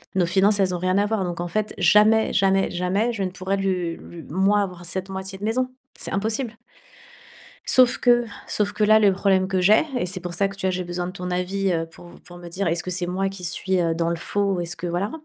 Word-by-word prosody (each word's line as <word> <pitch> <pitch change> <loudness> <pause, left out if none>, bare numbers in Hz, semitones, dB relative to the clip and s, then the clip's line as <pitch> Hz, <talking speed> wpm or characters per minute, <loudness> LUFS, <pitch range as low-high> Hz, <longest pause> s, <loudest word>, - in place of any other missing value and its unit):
nos 185 -2 +3
finances, 195 +4 +3
elles 185 -2 +2
ont - - -2
rien 185 +2 +1
à 205 - +3
voir. 210 -2 -1
Donc 175 -2 -4
en 175 - -2
fait 215 +4 -2
jamais, 210 +5 +4
jamais, 195 0 +2
jamais, 190 +6 0
je 205 -4 -3
ne 185 - -1
pourrais 185 +1 -3
lui 180 -3 -1
lui 170 -2 -11
moi 195 +6 +2
avoir 180 -3 -5
cette 190 +2 -4
moitié 190 0 -6
de 205 - -4
maison. 255 +4 0 0.3
C'est - - -6
impossible. 220 +3 -2 1.1
Sauf 250 -1 +5
que 240 -1 +4 0.2
sauf 210 -1 0
que 215 - 0
là, 215 +1 +6
le 205 -2 +4
problème 190 -1 +2
que 190 -1 0
j'ai 205 +8 +5
et 180 - -1
c'est 185 +1 -4
pour 175 -1 -6
ça 200 +1 +1
que 195 - -10
tu 190 - -3
vois - - +2
j'ai 185 0 -3
besoin 175 0 -4
de 180 - -6
ton 180 -1 -6
avis, 185 +2 -1
heu, 165 -1 -1
pour 170 +1 -15
v - - -15
pour 175 0 -12
me 175 0 -10
dire 185 +3 -3
est-ce 165 0 0
que 185 - -5
c'est 180 0 -1
moi 190 +2 -1
qui 195 -2 -9
suis, 180 +2 0
heu, 165 -1 +1
dans 165 0 -1
le 170 - -1
faux 200 +3 -1
ou 180 - -2
est-ce 175 0 -4
que, 175 - -5
voilà? 175 +4 -2
190 Hz, 265 wpm, -23 LUFS, 175-200 Hz, 1.1 s, là